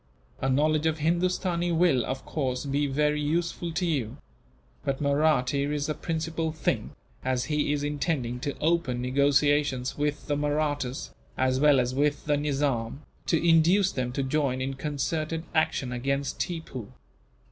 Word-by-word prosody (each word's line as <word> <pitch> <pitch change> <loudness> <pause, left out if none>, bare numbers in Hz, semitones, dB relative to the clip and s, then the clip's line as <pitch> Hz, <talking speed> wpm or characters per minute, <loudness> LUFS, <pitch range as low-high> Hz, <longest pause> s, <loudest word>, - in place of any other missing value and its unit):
A 135 - +1
knowledge 155 +3 +2
of 160 -1 0
Hindustani 175 +2 0
will, 165 -7 +3
of 130 +3 -4
course, 130 -3 -2
be 145 +1 0
very 150 +2 +1
useful 170 +3 -1
to 180 +3 0
you; 135 -7 -1 0.7
but 135 -1 -1
Mahratti 140 -2 +2
is 145 0 -1
the 155 - -1
principal 160 +1 -2
thing, 155 -1 -2 0.3
as 130 -1 0
he 150 -1 +1
is 145 -1 -1
intending 145 -4 -1
to 140 +2 -4
open 160 -6 +1
negotiations 140 +1 +2
with 150 0 -1
the 145 - 0
Mahrattas, 145 -3 -1 0.3
as 130 0 +2
well 145 -2 +5
as 125 0 0
with 145 +2 0
the 150 -1 +2
Nizam, 140 -4 -1 0.3
to 165 +1 +2
induce 170 +4 +5
them 125 -1 -2
to 135 - -1
join 135 -1 0
in 135 +1 -2
concerted 155 +3 -2
action 155 -5 +1
against 140 +3 -2
Tippoo. 160 - -4
145 Hz, 150 wpm, -27 LUFS, 135-160 Hz, 0.7 s, well